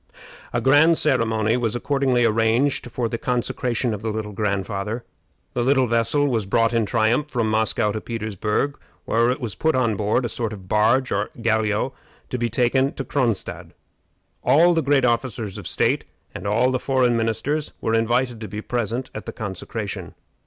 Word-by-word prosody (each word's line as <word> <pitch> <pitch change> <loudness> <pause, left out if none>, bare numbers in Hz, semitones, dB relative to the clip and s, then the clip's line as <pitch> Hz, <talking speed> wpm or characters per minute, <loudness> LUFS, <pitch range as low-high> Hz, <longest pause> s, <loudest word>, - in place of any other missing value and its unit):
A 120 - 0
grand 145 +7 +5
ceremony 115 -5 +1
was 120 -2 -1
accordingly 130 -2 +1
arranged 115 +4 +1
for 120 0 -2
the 115 0 -4
"consecration 125 -1 -1
of 105 - -5
the 110 - -2
Little 110 -1 -3
Grandfather." 100 +2 -2 0.5
The 125 - 0
little 130 +1 +3
vessel 115 +5 +1
was 115 -7 -1
brought 115 +3 +2
in 115 -3 +1
triumph 120 +7 +1
from 115 -5 0
Moscow 110 0 +1
to 110 - -4
Petersburg, 110 +4 -2 0.3
where 115 +1 +2
it 125 - -1
was 120 -6 -4
put 160 -2 +1
on 120 -4 +2
board 105 +5 +1
a - - +1
sort 115 -1 -3
of 95 -3 -10
barge 115 +6 +2
or 100 +1 0
galliot 110 +1 +1 0.4
to 125 - -1
be 120 0 0
taken 130 +3 +2
to 135 - -4
Cronstadt. 120 -7 -2 0.7
All 170 +4 +5
the 165 - +2
great 140 -3 +3
officers 115 -4 -1
of - - -7
state - - +1 0.3
and - - -6
all 115 +5 +2
the 130 - 0
foreign 130 -3 +2
ministers 125 +7 -1
were 110 - -1
invited 120 +1 +1
to 110 - -5
be 105 +2 -6
present 120 +1 -2
at - - -7
the - - -3
consecration. 100 -2 -5
115 Hz, 175 wpm, -23 LUFS, 110-130 Hz, 0.7 s, grand